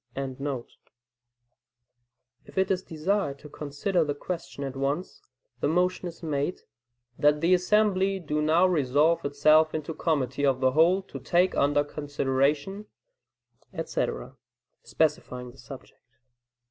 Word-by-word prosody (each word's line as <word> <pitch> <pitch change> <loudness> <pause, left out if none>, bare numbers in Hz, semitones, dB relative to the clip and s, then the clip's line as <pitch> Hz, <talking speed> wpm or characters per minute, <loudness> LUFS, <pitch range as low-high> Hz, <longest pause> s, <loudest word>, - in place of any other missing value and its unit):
] - - -59
If 135 -1 -4 1.9
it 190 0 +2
is 185 -1 +1
desired 160 -2 -1
to 150 - -12
consider 150 +6 -1
the 145 -2 -2
question 165 -2 -6
at 135 -1 -5
once, 140 - -3 0.4
the - - +1
motion 180 +3 +1
is 170 0 -10
made, 150 +2 -2 0.6
"That 150 0 +4
the 170 +4 +3
assembly 195 +1 +2
do 150 -3 -2
now 160 +4 +4
resolve 155 -1 +2
itself 155 +3 +4
into 155 0 -3
a - - -7
committee 145 -4 -1
of 135 -2 +2
the 130 0 +3
whole 170 +7 +4
to - - -9
take 180 +1 +2
under 145 +1 +3
consideration," 145 +6 -1 0.9
etc., - - -3 0.4
specifying 125 -5 -1
the 130 - -19
subject. 130 +2 -12
150 Hz, 130 wpm, -27 LUFS, 140-180 Hz, 1.9 s, That